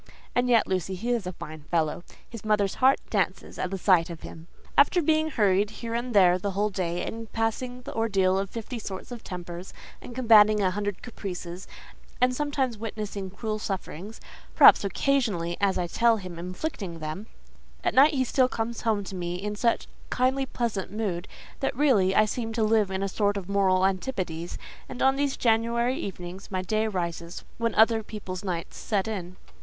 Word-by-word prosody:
And 245 Hz, 0 st, +1 dB
yet, 235 Hz, -2 st, +5 dB
Lucy, 185 Hz, 0 st, -2 dB
he 235 Hz, +7 st, -2 dB
is 230 Hz, -6 st, 0 dB
a 180 Hz, -, -4 dB
fine 155 Hz, -1 st, -9 dB
fellow: 165 Hz, 0 st, 0 dB, 0.2 s
his 230 Hz, -3 st, -9 dB
mother's 210 Hz, -2 st, +2 dB
heart 265 Hz, +1 st, +6 dB
dances -, -, -1 dB
at 185 Hz, -, -1 dB
the 195 Hz, -, -3 dB
sight 180 Hz, -2 st, +3 dB
of 170 Hz, -2 st, -8 dB
him. 165 Hz, +1 st, -10 dB, 0.3 s
After 290 Hz, +5 st, +5 dB
being 315 Hz, -1 st, +2 dB
hurried 205 Hz, -5 st, +2 dB
here 230 Hz, +1 st, -6 dB
and 240 Hz, 0 st, -2 dB
there 180 Hz, -2 st, +6 dB
the 200 Hz, -, -2 dB
whole 210 Hz, +1 st, +1 dB
day, 175 Hz, -2 st, -2 dB
and 225 Hz, 0 st, -6 dB
passing 245 Hz, +3 st, -2 dB
the -, -, -7 dB
ordeal 195 Hz, -4 st, +2 dB
of 195 Hz, -1 st, -3 dB
fifty 230 Hz, +2 st, -6 dB
sorts 195 Hz, +1 st, -7 dB
of 240 Hz, -2 st, -7 dB
tempers, 175 Hz, 0 st, -7 dB, 0.3 s
and 240 Hz, -, -9 dB
combating 215 Hz, -4 st, +6 dB
a 190 Hz, -2 st, +2 dB
hundred 205 Hz, 0 st, -3 dB
caprices, 185 Hz, -6 st, -6 dB, 0.5 s
and 255 Hz, 0 st, +3 dB
sometimes 270 Hz, -5 st, -1 dB
witnessing 210 Hz, -3 st, -5 dB
cruel 215 Hz, +2 st, -4 dB
sufferings—perhaps, 195 Hz, +1 st, +2 dB
occasionally, 200 Hz, -5 st, 0 dB
as 195 Hz, -1 st, +2 dB
I 180 Hz, -, 0 dB
tell 230 Hz, +6 st, +3 dB
him, 180 Hz, -4 st, -8 dB
inflicting 185 Hz, -, -5 dB
them—at 155 Hz, +7 st, -7 dB
night 290 Hz, +3 st, +6 dB
he 260 Hz, -, +2 dB
still 255 Hz, 0 st, +2 dB
comes 230 Hz, 0 st, -3 dB
home 215 Hz, -3 st, +1 dB
to 195 Hz, -, -8 dB
me 175 Hz, -1 st, -3 dB
in 210 Hz, +3 st, -4 dB
such 230 Hz, +2 st, +1 dB, 0.2 s
kindly, 265 Hz, +2 st, +1 dB
pleasant 220 Hz, -8 st, -2 dB
mood, 200 Hz, -4 st, -3 dB, 0.3 s
that 270 Hz, -2 st, -1 dB
really, 220 Hz, -10 st, +3 dB
I 215 Hz, -, +6 dB
seem 225 Hz, +1 st, -3 dB
to 225 Hz, -1 st, +1 dB
live 215 Hz, -2 st, +3 dB
in 190 Hz, 0 st, -2 dB
a -, -, 0 dB
sort 205 Hz, +1 st, 0 dB
of 190 Hz, -3 st, -5 dB
moral 190 Hz, -2 st, +3 dB
antipodes, 185 Hz, -4 st, -2 dB, 0.3 s
and 250 Hz, -, -7 dB
on 270 Hz, 0 st, +5 dB
these 280 Hz, 0 st, 0 dB
January 235 Hz, +2 st, +1 dB
evenings 185 Hz, 0 st, -7 dB
my 185 Hz, -1 st, -2 dB
day 215 Hz, +4 st, 0 dB
rises 170 Hz, -3 st, -4 dB, 0.2 s
when 230 Hz, -1 st, 0 dB
other 225 Hz, +1 st, +5 dB
people's 200 Hz, -4 st, -7 dB
night 175 Hz, -4 st, -4 dB
sets 205 Hz, -2 st, -1 dB
in. 185 Hz, -4 st, -5 dB
205 Hz, 180 wpm, -27 LUFS, 185-235 Hz, 0.5 s, heart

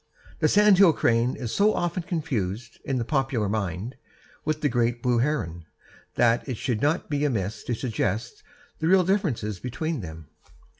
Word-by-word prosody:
The -, -, +3 dB
sandhill 200 Hz, -4 st, +6 dB
crane 120 Hz, -1 st, +2 dB
is 120 Hz, -3 st, -5 dB
so 210 Hz, +2 st, +3 dB
often 175 Hz, +1 st, -1 dB
confused, 120 Hz, -, -3 dB
in 135 Hz, -, -1 dB
the 120 Hz, -, -1 dB
popular 135 Hz, -6 st, 0 dB
mind, 100 Hz, +2 st, -3 dB, 0.5 s
with 155 Hz, 0 st, -1 dB
the 150 Hz, -, +3 dB
great 120 Hz, -2 st, 0 dB
blue 125 Hz, -2 st, +2 dB
heron, 85 Hz, -, -2 dB, 0.5 s
that 120 Hz, +3 st, +2 dB
it 125 Hz, -, -4 dB
may 125 Hz, -, +2 dB
not 145 Hz, +9 st, 0 dB
be 145 Hz, -1 st, -1 dB
amiss 110 Hz, -7 st, -1 dB
to 120 Hz, -, -1 dB
suggest 110 Hz, -1 st, -2 dB, 0.4 s
the 160 Hz, -, 0 dB
real 185 Hz, +1 st, +5 dB
differences 150 Hz, -, -1 dB
between 135 Hz, -, -3 dB
them. 80 Hz, -3 st, -8 dB
125 Hz, 160 wpm, -25 LUFS, 110-155 Hz, 0.5 s, sandhill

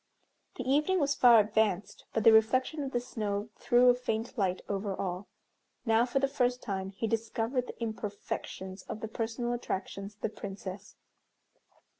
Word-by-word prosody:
The 255 Hz, -, -4 dB
evening 300 Hz, +8 st, +3 dB
was 285 Hz, -2 st, +2 dB
far 240 Hz, -4 st, +7 dB
advanced, 210 Hz, -2 st, 0 dB
but 220 Hz, -, 0 dB
the 225 Hz, -, +8 dB
reflection 255 Hz, +7 st, +3 dB
of 270 Hz, -2 st, -3 dB
the 245 Hz, -, +1 dB
snow 215 Hz, -3 st, -3 dB
threw 245 Hz, +1 st, +4 dB
a 245 Hz, -, +8 dB
faint 240 Hz, -1 st, -3 dB
light 190 Hz, -5 st, 0 dB
over 200 Hz, -1 st, -2 dB
all. 185 Hz, +1 st, -4 dB, 0.6 s
Now, 225 Hz, +1 st, +4 dB
for 250 Hz, -, -1 dB
the 275 Hz, 0 st, +3 dB
first 250 Hz, -3 st, +1 dB
time, 190 Hz, -3 st, -3 dB
he 195 Hz, +3 st, -4 dB
discovered 230 Hz, +3 st, -1 dB
the -, -, -9 dB
imperfections 205 Hz, -3 st, -5 dB
of 215 Hz, -, -5 dB
the 220 Hz, -, -3 dB
personal 230 Hz, +2 st, -2 dB
attractions 200 Hz, -3 st, -4 dB
of 215 Hz, -, -40 dB
the -, -, 0 dB
Princess. 195 Hz, -1 st, -8 dB
225 Hz, 165 wpm, -30 LUFS, 200-245 Hz, 0.6 s, the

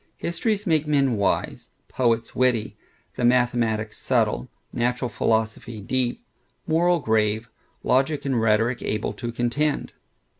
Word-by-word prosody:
Histories 210 Hz, +4 st, -1 dB
make 160 Hz, -4 st, +1 dB
men 140 Hz, -5 st, +2 dB
wise; 100 Hz, -1 st, -1 dB, 0.2 s
poets 115 Hz, -2 st, 0 dB
witty; 125 Hz, -4 st, +1 dB, 0.4 s
the -, -, -2 dB
mathematics 120 Hz, -3 st, +1 dB
subtile; -, -, 0 dB, 0.2 s
natural 125 Hz, +1 st, 0 dB
philosophy 110 Hz, 0 st, -1 dB
deep; 125 Hz, +4 st, -2 dB, 0.4 s
moral 175 Hz, +2 st, +3 dB
grave; 110 Hz, -4 st, +1 dB, 0.4 s
logic 135 Hz, +4 st, +1 dB
and 130 Hz, -4 st, +1 dB
rhetoric 115 Hz, +3 st, +2 dB
able 105 Hz, -1 st, -2 dB
to 120 Hz, +2 st, -5 dB
contend. 125 Hz, +5 st, -1 dB
120 Hz, 115 wpm, -24 LUFS, 110-140 Hz, 0.4 s, moral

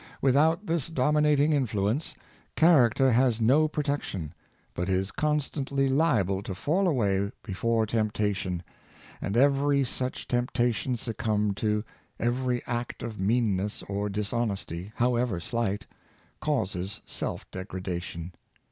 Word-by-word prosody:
With 135 Hz, -1 st, +3 dB
out 160 Hz, +7 st, +3 dB
this 165 Hz, -6 st, 0 dB
dominating 150 Hz, 0 st, +3 dB
influence, 115 Hz, 0 st, 0 dB, 0.4 s
character 135 Hz, -5 st, +5 dB
has 120 Hz, -1 st, +3 dB
no 135 Hz, +8 st, +4 dB
protec 145 Hz, -2 st, -1 dB
tion, 80 Hz, -4 st, -5 dB, 0.4 s
but 90 Hz, +2 st, -2 dB
is 95 Hz, +1 st, 0 dB
constantly 140 Hz, -2 st, 0 dB
liable 120 Hz, -, +2 dB
to 100 Hz, -2 st, -5 dB
fall 180 Hz, -, +1 dB
away 100 Hz, -, +1 dB
before 115 Hz, +2 st, 0 dB
tempta 105 Hz, -2 st, 0 dB
tion; 90 Hz, -2 st, -3 dB, 0.6 s
and 100 Hz, +3 st, -1 dB
every 140 Hz, +1 st, +4 dB
such 130 Hz, 0 st, -3 dB
temptation 120 Hz, 0 st, 0 dB
succumbed 105 Hz, -3 st, -1 dB
to, 105 Hz, -1 st, 0 dB, 0.4 s
every 125 Hz, +1 st, 0 dB
act 120 Hz, 0 st, -4 dB
of 115 Hz, -4 st, -5 dB
meanness 105 Hz, -1 st, 0 dB
or 100 Hz, +1 st, -2 dB
dishonesty, 100 Hz, -3 st, -2 dB
however 120 Hz, -5 st, +1 dB
slight, 105 Hz, +1 st, -2 dB, 0.5 s
causes 100 Hz, -8 st, -2 dB
selfdegradation. 90 Hz, -2 st, -5 dB
115 Hz, 115 wpm, -28 LUFS, 100-135 Hz, 0.6 s, character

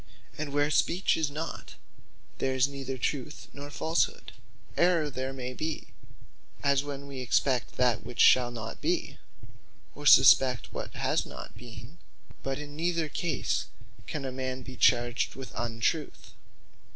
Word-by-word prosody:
And 150 Hz, -2 st, -4 dB
where 145 Hz, +1 st, +1 dB
Speech 180 Hz, +4 st, +2 dB
in 155 Hz, -3 st, -1 dB
not, 155 Hz, +3 st, -6 dB, 0.6 s
there 130 Hz, 0 st, 0 dB
is 130 Hz, +1 st, +4 dB
neither 135 Hz, -2 st, -5 dB
Truth 135 Hz, +3 st, -3 dB
nor 145 Hz, 0 st, -8 dB
Falshood. 160 Hz, +3 st, 0 dB, 0.4 s
Errour 170 Hz, -4 st, +3 dB
there 130 Hz, 0 st, -3 dB
may 130 Hz, -1 st, -5 dB
be, 155 Hz, +4 st, -4 dB, 0.7 s
as 140 Hz, -1 st, +3 dB
when 140 Hz, -1 st, -6 dB
wee 140 Hz, -2 st, -7 dB
expect 125 Hz, 0 st, +1 dB
that 125 Hz, -3 st, +2 dB
which 120 Hz, +1 st, -9 dB
shall 125 Hz, -1 st, +6 dB
not 115 Hz, -2 st, -7 dB
be; -, -, -1 dB, 0.7 s
or 145 Hz, +1 st, -3 dB
suspect 130 Hz, -3 st, +6 dB
what -, -, -6 dB
has -, -, +1 dB
not -, -, -9 dB
been: 120 Hz, +7 st, -11 dB, 0.4 s
but 135 Hz, 0 st, -2 dB
in 145 Hz, 0 st, -8 dB
neither 165 Hz, -1 st, 0 dB
case 170 Hz, +3 st, -1 dB, 0.4 s
can 145 Hz, -3 st, -4 dB
a 130 Hz, -, -3 dB
man 130 Hz, 0 st, -4 dB
be 130 Hz, +1 st, -9 dB
charged 120 Hz, -1 st, +2 dB
with 130 Hz, -2 st, -8 dB
Untruth. 120 Hz, +6 st, -2 dB
135 Hz, 145 wpm, -29 LUFS, 125-150 Hz, 0.7 s, shall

